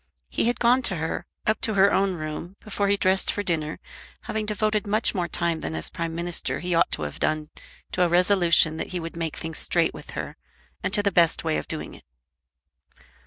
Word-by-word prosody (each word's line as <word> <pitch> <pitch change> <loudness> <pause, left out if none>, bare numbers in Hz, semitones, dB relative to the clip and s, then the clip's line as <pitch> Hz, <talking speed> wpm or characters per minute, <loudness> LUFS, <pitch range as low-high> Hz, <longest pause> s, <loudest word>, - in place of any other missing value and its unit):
He - - 0
had 240 0 +1
gone 245 +2 +4
to 190 - -2
her, 160 0 -3 0.2
up 215 - +1
to 220 - +1
her 200 +1 +5
own 195 -1 +2
room, 155 +3 -6
before 205 -1 -2
he 200 0 +3
dressed 190 0 +2
for 205 - -3
dinner, 160 -4 -1 0.4
having 215 -1 -3
devoted 215 0 0
much 215 +3 +2
more 180 -4 -1
time 170 0 0
than 80 - -4
as 80 - -1
Prime 165 -1 -4
Minister 170 0 -1
he 180 0 -2
ought 170 - +3
to - - -2
have 75 - -6
done 155 0 -1 0.4
to 180 - -1
a 175 - +4
resolution 175 -3 +4
that - - -3
he 180 - -1
would 165 0 -6
make 165 -2 -3
things 160 -1 -5
straight 170 -2 +1
with - - -11
her, - - -5 0.4
and - - -1
to 205 - +3
the 200 - +2
best 170 -2 +3
way 160 -1 0
of - - -8
doing 160 - -5
it. - - -14
175 Hz, 215 wpm, -25 LUFS, 165-200 Hz, 0.4 s, her